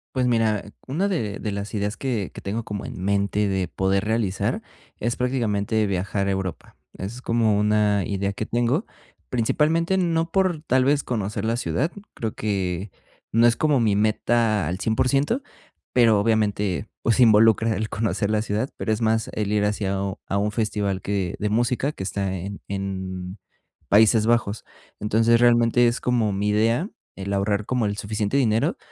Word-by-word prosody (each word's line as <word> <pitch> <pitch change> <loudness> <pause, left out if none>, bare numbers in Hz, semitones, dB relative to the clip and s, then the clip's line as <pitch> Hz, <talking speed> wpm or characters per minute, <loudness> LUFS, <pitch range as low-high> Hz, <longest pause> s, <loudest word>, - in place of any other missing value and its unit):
Pues, 130 -1 +2
mira, 115 -4 +1 0.2
una 160 +10 0
de 115 - -2
de 105 - -3
las 100 +1 -5
ideas 105 0 -2
que 120 -8 -2
que - - -9
tengo 110 +4 -3
como 105 -2 -5
en - - -7
mente 100 +1 +1
de 95 -2 -1
poder 95 +1 0
realizar 110 -3 -1 0.4
es, 120 +2 -1
prácticamente, 110 -4 0
viajar 100 +1 -1
a 100 - +1
Europa. 95 -2 -4 0.2
Es 110 +6 -7
como 115 -4 +2
una 105 -2 +2
idea 100 0 -2
que 110 - -4
tengo, 120 - 0 0.4
principalmente, 160 +9 +1
no 165 -2 0
por, 185 -5 +1
tal 130 -4 +2
vez, 140 +1 +2
conocer 105 -2 -3
la 115 +1 0
ciudad, 120 - -1 0.2
creo 110 -2 -3
que 95 -2 -2 0.4
no 115 +2 +4
es 115 - +3
como 150 -4 +2
mi 110 -4 +2
meta 110 -3 +1
al 90 +3 -3
100%, 135 - +1 0.5
pero, 115 -4 +5
obviamente, 105 -3 0
pues, 115 +2 +1
involucra 110 -1 +5
el 110 0 -3
conocer 105 -1 -1
la 105 - +2
ciudad, 110 +4 -2
pero 110 - -2
es 110 +1 -1
más 110 0 +1
el 105 -1 -2
ir 105 -1 +2
hacia 105 -2 -1
a 95 - -2
un 100 -1 -3
a 100 - -1
un 105 +1 0
festival 105 -4 -1
que 95 -3 -2
de 105 - -1
música 120 +5 +1
que 95 - -7
está 95 0 -2
en 100 +3 -6
en 95 -1 -5 0.5
Países 110 +1 +5
Bajos. 115 -2 0 0.3
Entonces, 115 +3 +3
realmente, 120 0 +4
es 120 - -1
como 120 -4 +1
mi 100 +2 0
idea 115 - +1 0.3
el 100 +1 -4
ahorrar 100 +1 0
como 125 -3 0
el 100 0 -3
suficiente 105 +4 -1
dinero 115 -4 +2
110 Hz, 175 wpm, -23 LUFS, 100-120 Hz, 0.5 s, pero